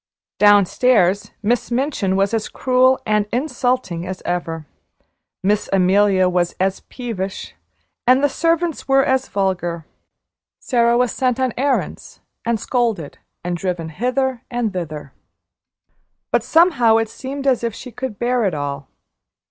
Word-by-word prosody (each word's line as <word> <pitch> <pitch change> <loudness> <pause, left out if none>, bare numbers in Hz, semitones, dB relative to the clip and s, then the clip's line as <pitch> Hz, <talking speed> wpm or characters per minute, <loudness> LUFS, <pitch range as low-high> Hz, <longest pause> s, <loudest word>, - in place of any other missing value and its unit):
Downstairs 205 -1 +4
Miss 235 +3 0
Minchin 240 -6 0
was 195 +2 +1
as 225 -2 -1
cruel 255 0 +3
and 210 -1 +1
insulting 245 - -1
as 185 0 -6
ever, 165 -3 -3 0.8
Miss 205 +2 +1
Amelia 190 0 +3
was 175 -1 0
as 190 +1 0
peevish, 210 -6 -5 0.5
and 255 +3 +5
the - - +6
servants 330 +2 -1
were 270 0 +4
as 265 0 +1
vulgar. 175 -4 -2 0.7
Sara 235 -1 +2
was 250 -1 +2
sent 255 -1 0
on 260 -2 0
errands, 275 +1 -2 0.2
and 230 -1 0
scolded, 225 - -1 0.2
and 175 0 -2
driven 175 -2 -3
hither 250 - -1
and 240 -4 -2
thither, 155 -6 -6 1.2
but - - +3
somehow 280 -10 +4
it 225 0 0
seemed 270 +4 -7
as 255 -3 +2
if 230 -2 -2
she 250 - -9
could 250 -4 -5
bear 245 +1 0
it 185 -5 0
all. 140 -1 -4
225 Hz, 135 wpm, -20 LUFS, 185-255 Hz, 1.2 s, the